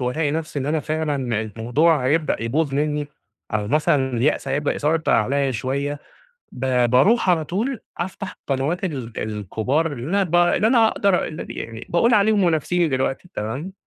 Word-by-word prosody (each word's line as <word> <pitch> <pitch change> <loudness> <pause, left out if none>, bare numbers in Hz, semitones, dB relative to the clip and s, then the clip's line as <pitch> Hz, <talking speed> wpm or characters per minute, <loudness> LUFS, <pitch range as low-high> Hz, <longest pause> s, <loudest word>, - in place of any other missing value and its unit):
وألاقي 145 +5 0
نفسي 155 -1 -3
إن 135 - -3
أنا 155 +1 0
فعلًا 155 -1 -1 0.4
الموضوع 140 +6 +2
هيبدأ 155 -4 +1
يبوظ 135 +5 0
منّي 150 0 0 0.5
أو 105 -1 -1
مثلًا 140 -2 +2
اليأس 135 +3 +1
هيبدأ 145 +2 0
يسيطر 155 +2 +1
عليّا 135 +5 +2
شويّة 140 +4 -2 0.5
ب 125 -1 +1
باروح 190 - +4
على 165 -3 +2
طول 220 - -2 0.2
أفتح 185 +2 -5
قنوات 145 +7 -1
ال 130 -10 -4
الكبار 110 - -1
اللي 125 -1 -6
أنا 200 +4 +1
ب 175 -3 -3
اللي 175 +4 +3
أنا 230 -1 +5
أقدر 200 -4 +1
اللي 155 - -6
أنا - - -8
يعني 115 0 -7
باقول 230 +8 +3
عليهم 210 -1 +3
منافسيني 170 +1 +1
دلوقتي 135 +4 -2
تمام، 130 - -4
150 Hz, 165 wpm, -22 LUFS, 130-170 Hz, 0.5 s, أنا